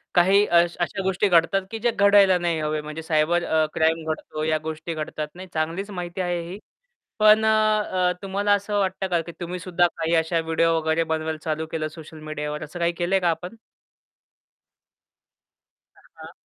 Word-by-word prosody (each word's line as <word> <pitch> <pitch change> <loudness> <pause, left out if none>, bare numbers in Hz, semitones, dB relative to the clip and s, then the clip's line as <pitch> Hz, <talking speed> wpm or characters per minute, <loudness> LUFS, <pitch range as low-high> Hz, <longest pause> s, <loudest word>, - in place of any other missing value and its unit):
काही 190 +3 +5
अ 175 - 0 0.2
अशा 175 +3 -2
गोष्टी 190 +2 +1
घडतात 180 +2 +3
की 225 - -4
जे 240 +2 +1
घडायला 200 -3 +5
नाही 170 -2 -1
हवे 155 0 -2
म्हणजे 150 +1 -7
सायबर 160 +2 +1
अ, 160 -1 +2
क्राईम 160 0 +1
घडतो 155 0 -5
या 155 0 +1
गोष्टी 160 +1 -5
घडतात. 155 -1 -4
नाही, 185 +1 -9
चांगलीच 165 +6 -2
माहिती 180 -1 -5
आहे 175 -1 -1
ही 195 - -7 0.6
पण 215 0 +6
अ, - - +3 0.6
अ, - - +2
तुम्हाला 200 +1 0
असं 205 +1 0
वाटतं 190 0 -1
का 175 -2 +1
की 170 - -7
तुम्ही 180 +1 -4
सुद्धा 175 0 +1
काही 165 0 0
अशा 165 +1 +1
व्हिडिओ 165 +1 +1
वगैरे 160 +1 0
बनवायला 160 0 -2
चालू 160 0 -2
केलं 155 -1 -2
सोशल 155 0 -12
मीडियावर 150 -1 -5
असं 155 +4 -9
काही 170 0 +1
केलंय 175 +3 0
का 175 - +1
आपण? 180 +6 -5 2.4
हां, - - -23 0.2
हां. - - -10
170 Hz, 180 wpm, -24 LUFS, 160-190 Hz, 2.4 s, पण